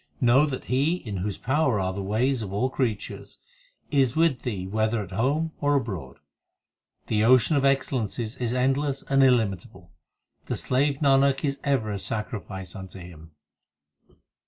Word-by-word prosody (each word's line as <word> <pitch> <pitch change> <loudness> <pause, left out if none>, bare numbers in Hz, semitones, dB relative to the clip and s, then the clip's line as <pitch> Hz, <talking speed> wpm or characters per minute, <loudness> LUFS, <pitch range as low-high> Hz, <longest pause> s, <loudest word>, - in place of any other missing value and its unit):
Know 130 +5 +4
that 130 -3 -4
He 140 +7 +1
in 105 - -6
whose 95 +2 -3
power 130 -4 +1
are 95 -1 -1
the 100 - -4
ways 115 +6 0
of 100 -3 -5
all 125 +7 0
creatures, 115 -7 -3 0.5
Is 135 -5 +2
with 160 -5 +2
thee 100 -7 -4
whether 110 +2 0
at 95 - -12
home 140 - 0
or 145 0 +2
abroad. 95 - -3 0.9
The 105 -1 +1
Ocean 130 +5 +5
of 140 - +2
excellences 125 -4 0
is 120 -2 -2
endless 135 +2 0
and 135 0 +4
illimitable; 110 -8 0 0.6
The - - -2
slave 140 +2 0
Nanak 135 0 +3
is 140 -1 -2
ever 130 -7 0
a 100 - -3
sacrifice 105 -4 -5
unto 95 0 -9
Him. 85 -3 -12
125 Hz, 155 wpm, -25 LUFS, 100-135 Hz, 0.9 s, Ocean